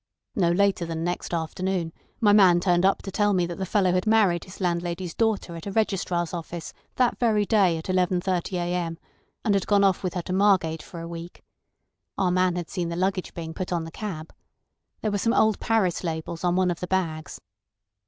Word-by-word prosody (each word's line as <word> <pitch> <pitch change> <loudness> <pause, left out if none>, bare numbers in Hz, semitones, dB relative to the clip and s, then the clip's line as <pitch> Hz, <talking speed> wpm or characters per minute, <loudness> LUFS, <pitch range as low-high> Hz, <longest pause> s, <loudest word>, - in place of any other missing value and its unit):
No 175 -4 +2
later 195 +1 +2
than 165 -1 -3
next 175 +1 -3
afternoon 170 +1 -2 0.3
my 210 -3 +5
man 185 -4 +6
turned 175 0 +2
up 195 - 0
to 195 - -6
tell 205 +1 +2
me 180 -2 +2
that 170 +1 -6
the 190 - -2
fellow 185 -1 +2
had 180 +3 0
married 205 -6 +3
his 185 - -12
landlady's 175 -1 -2
daughter 220 -6 0
at 165 +3 -8
a - - -3
registrar's 185 -5 0
office 170 -1 -6 0.2
that 250 -2 +1
very 215 -4 +2
day 195 -6 +3
at 160 - -6
11.30 185 0 0
a.m., 175 -2 -2 0.5
and 210 - +3
had 195 -2 0
gone 200 -1 +4
off 195 -2 +3
with 185 -2 -3
her 180 - -2
to 180 - -4
Margate 185 -5 +2
for 170 +1 -9
a 165 - -6
week. 170 +1 -9 0.7
Our 185 -2 +2
man 185 0 +2
had 175 -2 -5
seen 175 -3 -2
the 170 - -3
luggage 185 +1 -1
being 160 -1 -5
put 185 +2 -5
on 170 -2 0
the 165 - -8
cab. 165 -5 -6 0.7
There 215 - -1
were 205 - 0
some 230 +3 +1
old 220 -2 +3
Paris 200 -7 +1
labels 165 0 -4
on 175 0 +2
one 185 -1 +2
of 170 - -4
the 180 - -4
bags. 165 -4 -2
180 Hz, 210 wpm, -25 LUFS, 170-195 Hz, 0.7 s, man